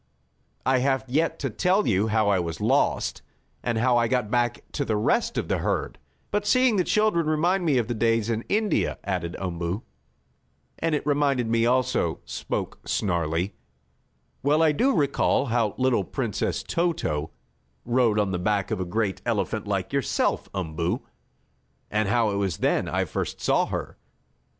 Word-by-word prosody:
"I 130 0 +3
have 135 0 +1
yet 155 +6 +1
to 135 -4 -2
tell 185 - +2
you 100 +1 +2
how 110 -1 +2
I 100 -2 +3
was 85 -2 -4
lost, - - +1 0.4
and 120 -2 -1
how 120 +1 +3
I 120 -1 +3
got 120 -3 0
back 120 -2 0
to - - -1
the 110 - -1
rest 105 - +1
of - - -1
the - - 0
herd. - - -2 0.3
But 205 0 -1
seeing 255 -4 +4
the 180 - +3
children 210 -5 +2
remind 175 +4 +1
me 145 -5 +3
of 120 -3 +1
the 120 - -1
days 115 -1 +1
in 115 0 -1
India," 210 0 +1
added 90 -3 -3
Umboo. 90 +2 -3 1.0
"And 165 -1 +1
it 145 - -3
reminded 140 -5 +1
me 115 0 +3
also," 125 -9 +1
spoke - - -4
Snarlie. 85 -1 -1 0.9
"Well 150 +3 +3
do 250 - +2
I - - 0
recall 140 -2 +2
how 115 -4 +1
little 130 -5 +2
Princess - - -2
Toto 160 - -1 0.6
rode 120 -3 +2
on 105 -2 +1
the 90 - -1
back 100 +1 0
of - - -1
a 95 - -1
great 100 +1 -1
elephant - - -1
like - - -2
yourself, - - 0
Umboo, 85 -2 -2 0.9
and 105 -1 +1
how 115 -1 +2
it 100 - -1
was 95 -5 -1
then - - +1
I - - 0
first - - -4
saw - - +2
her. - - -5
120 Hz, 170 wpm, -25 LUFS, 100-145 Hz, 1.0 s, seeing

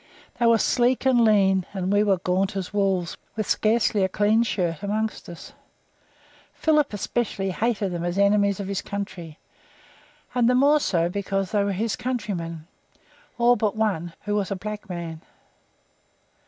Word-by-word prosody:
They 235 - +3
were 230 -1 +5
sleek 245 +3 +1
and 260 -2 +4
clean, 195 -4 +4
and 190 0 -1
we 205 - +4
were 200 -2 +3
gaunt 185 +2 -1
as 190 0 -4
wolves, 195 -4 0 0.2
with 215 -2 -2
scarcely 215 -2 +2
a 190 - +1
clean 210 +4 +2
shirt 180 -8 -1
among 215 +2 -1
us. 170 - -11 1.0
Philip, 300 -3 +2
especially 205 -2 -2
hated 205 -1 -1
them 175 -1 -4
as 175 +2 -2
enemies 200 0 +3
of 200 - -4
his 200 -1 -2
country, 175 -6 -6 1.0
and 245 -1 +3
the 250 - +3
more 285 +4 +5
so 170 - +1
because 195 +1 -2
they 205 -2 +2
were 200 - 0
his 215 +3 -1
countrymen, 185 -10 -4 0.7
all 240 +1 +4
but 215 -2 -1
one, 180 -6 -1
who 205 - -2
was 205 -2 0
a 200 - -2
black 210 +2 -7
man. 170 -3 -6
200 Hz, 160 wpm, -24 LUFS, 185-220 Hz, 1.0 s, were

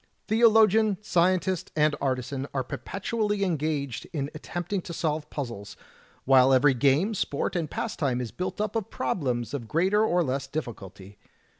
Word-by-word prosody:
"Theologian, 220 -2 +4
scientist, 185 -2 +1
and 150 0 +3
artisan 135 0 -2
are 130 - 0
perpetually 200 - -2
en 180 -4 +1
gaged 145 -4 -3
in 145 -3 -3
attempting 175 +5 -4
to 170 - -8
solve 155 -2 -2
puzzles, 115 -8 -6 0.5
while 130 0 +6
every 135 +2 +5
game, 145 - +2
sport, 165 -4 -2
and 165 -4 -1
pastime 140 - -2
is 120 -3 -4
built 180 - -4
up 210 +1 -2
of 220 -4 -2
problems 125 -7 -2
of 125 -6 -4
greater 190 - +2
or 180 -5 +2
less 135 -1 -2
difficulty. 105 - -7
155 Hz, 150 wpm, -27 LUFS, 130-190 Hz, 0.5 s, while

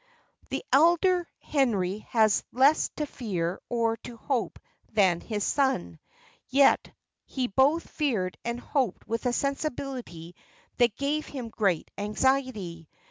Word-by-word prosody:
The - - -3
elder 345 +4 +4
Henry 210 -9 0
had 220 -2 +4 0.2
less 275 +5 +4
to 300 - -2
fear 185 - -3
or 230 -1 +1
to 235 0 -10
hope 250 0 -2 0.3
than 190 -5 +3
his 210 -3 -3
son; 225 - 0 0.5
yet 275 +1 +4 0.3
he 260 -2 -2
both 270 +8 +2
feared 220 - -1
and 235 0 -3
hoped 250 -5 -2
with 230 +3 -2
a - - +2
sensibility 255 - -3 0.4
that 240 -3 +3
gave 295 +2 -1
him 250 -5 -6
great 195 -7 0
anxiety. 210 - -1
240 Hz, 125 wpm, -27 LUFS, 200-275 Hz, 0.5 s, elder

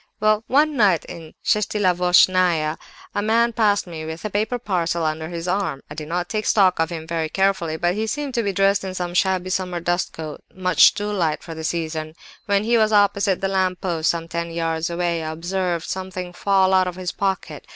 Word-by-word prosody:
"Well, 215 +1 +2
one 295 +3 +3
night 200 -9 +3
in - - -8
the - - -19
Shestilavochnaya, 180 -5 +3 0.3
a 205 - 0
man 230 +2 +2
passed 210 -3 +2
me 165 -3 -7
with 160 +4 -7
a 215 - -3
paper 215 +5 0
parcel 175 -7 -1
under 155 +1 -2
his 170 0 -5
arm. 185 -7 -1
I - - -4
did 150 0 -7
not 175 +2 -2
take 215 +1 -3
stock 190 -5 +4
of 165 0 +1
him 165 -2 -6
very 160 -1 -2
carefully, 190 -4 0
but 175 +2 +1
he 215 +3 -2
seemed 285 +3 -3
to 235 - +1
be 200 -3 -1
dressed 195 +1 +2
in 190 -1 -5
some 175 -1 -3
shabby 185 0 +1
summer 180 -2 -2
dust 175 +2 -1
coat, 155 -2 -7
much 185 -3 +4
too 205 0 -3
light 170 -7 -1
for 165 - -7
the 160 0 -7
season. 155 -1 -3 0.3
When 200 0 +2
he 230 +1 +3
was 215 0 +3
opposite 200 -2 +2
the 195 - +1
lamp 185 -1 0
post, 170 -4 0
some 165 -1 -1
ten 170 0 -3
yards 165 0 -2
away, 170 -1 -1
I 155 0 -4
observed 175 +1 -2
something 185 -1 -5
fall 190 0 +2
out 185 -1 +4
of 180 - -4
his 185 -1 -4
pocket. 195 -1 -3
180 Hz, 215 wpm, -22 LUFS, 165-200 Hz, 0.3 s, stock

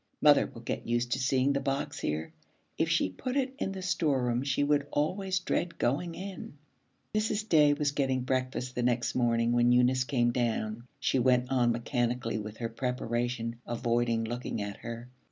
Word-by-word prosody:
Mother - - +6
will - - -12
get - - -4
used 120 +1 0
to 130 - +1
seeing 135 +1 +2
the 140 - +1
box 135 0 -2
here. 75 +1 -3 0.4
If - - 0
she - - +3
put 255 - -4
it 265 -1 0
in 195 - -1
the 190 -1 -6
storeroom 135 -9 +1
she 140 +1 0
would 145 0 +2
always 185 +5 0
dread 175 -1 -1
going 165 +7 0
in.' 190 -5 -7 0.6
Mrs. 215 0 0
Day 150 -6 +5
was 145 -1 0
getting 135 -2 0
breakfast 130 0 -2
the 125 - -2
next 120 0 +1
morning 115 -1 +2
when 120 0 +4
Eunice 125 +1 +4
came 120 -3 +2
down. 115 -1 -2
She 130 - +1
went 125 0 +2
on 120 -2 +3
mechanically 120 -1 -1
with 105 0 -7
her 115 -1 -3
preparation, 120 -1 -2
avoiding 120 -1 0
looking 120 0 -4
at 100 -1 -4
her. 115 +1 -7
125 Hz, 175 wpm, -30 LUFS, 120-145 Hz, 0.6 s, Mother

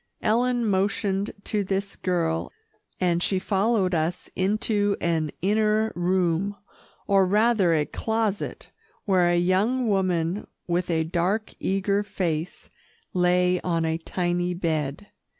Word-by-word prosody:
Ellen 240 +2 +2
motioned 200 0 0
to 210 -2 -1
this 195 +1 -2
girl, 165 -3 -1 0.5
and 175 -2 +1
she 190 - +1
followed 195 0 +1
us 165 +2 -1
into 205 +1 +1
an 160 -2 0
inner 215 +2 +2
room, 180 +2 +1 0.5
or 195 -1 +4
rather 205 -2 +3
a 150 -1 +1
closet, 220 0 -2 0.3
where 185 -3 +3
a 175 - +2
young 205 +8 +2
woman 185 -2 0 0.2
with 175 +1 -1
a 160 -1 +1
dark, 180 +6 -1
eager 195 +1 0
face 170 -5 -3 0.4
lay 180 0 +3
on 165 -2 0
a 160 0 -1
tiny 175 +1 -1
bed. 160 -1 -2
185 Hz, 120 wpm, -25 LUFS, 175-205 Hz, 0.5 s, or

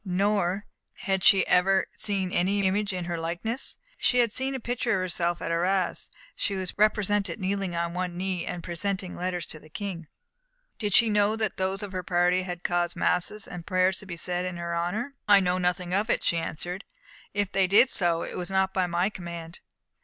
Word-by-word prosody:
No, 200 +2 +1
nor 195 +1 0 0.3
had 190 -2 -2
she 195 -1 +6
ever 190 +1 +3
seen 195 -4 0
any 195 +3 +1
image 200 +2 +1
in 180 -2 -3
her 170 -1 -3
likeness. 175 +10 -3 0.2
She 250 - +3
had 235 -3 +4
seen 265 +3 -2
a - - -3
picture 240 -1 -1
of 190 - +1
herself 175 -1 -1
at - - -2
Arras. 180 +2 0 0.3
She 200 - -2
was 185 -1 -3
represented 205 -2 +2
kneeling 195 -2 -1
on 170 0 -1
one 180 -1 -3
knee, 185 -2 -2
and 175 -1 -5
presenting 185 +1 -3
letters 180 -1 -2
to 155 - -8
the 155 - -17
King. 180 -3 -5 0.7
Did 205 -3 +1
she 230 - +7
know 210 +1 +3
that 220 -3 -2
those 190 +2 -1
of 205 - -6
her 185 -1 -3
party 180 0 +2
had 180 -1 -6
caused 175 0 0
masses 200 +4 0
and 175 -2 -8
prayers 185 0 +2
to 200 - -9
be 170 -2 -6
said 180 +1 -1
in 180 -1 -4
her 170 0 -3
honour? 210 +11 -2
"I 205 -1 +8
know 180 -1 +1
nothing 180 0 -1
of 205 +4 +1
it," - - +1
she 170 - +2
answered, 175 +4 -3 0.5
"and 205 - +3
if 195 - -11
they 195 -1 +3
did 225 +7 +6
so, 170 -3 +3
it - - -6
was 180 0 -4
not 190 0 +1
by 185 -2 +1
my 175 +4 +1
command. 170 -2 -8
185 Hz, 210 wpm, -27 LUFS, 175-200 Hz, 0.7 s, I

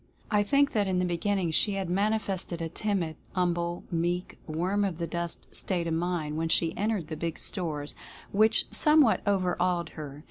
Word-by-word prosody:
I 210 -1 +4
think 280 +7 +3
that 205 -3 +1
in 185 -1 +1
the 180 - +2
beginning 180 0 0
she 205 +6 +3
had 195 -2 -2
manifested 195 -2 0
a 165 -1 -3
timid, 175 -4 -1 0.2
"hum 180 -2 +2
ble," 170 0 -3
meek, 175 +2 -1
"worm 180 +6 0
of 190 -5 -1
the 170 - -2
dust" 170 0 -4
state 175 -3 -1
of 165 - -1
mind 165 -3 -1
when 165 0 -1
she 165 0 +2
entered 210 -4 0
the 155 - -4
big 165 +1 -3
stores, 155 -6 -3 0.4
which 215 +2 +4
somewhat 300 -6 +5
over 185 -3 +2
awed 175 -2 +1
her. 145 -2 -8
175 Hz, 185 wpm, -28 LUFS, 165-200 Hz, 0.4 s, somewhat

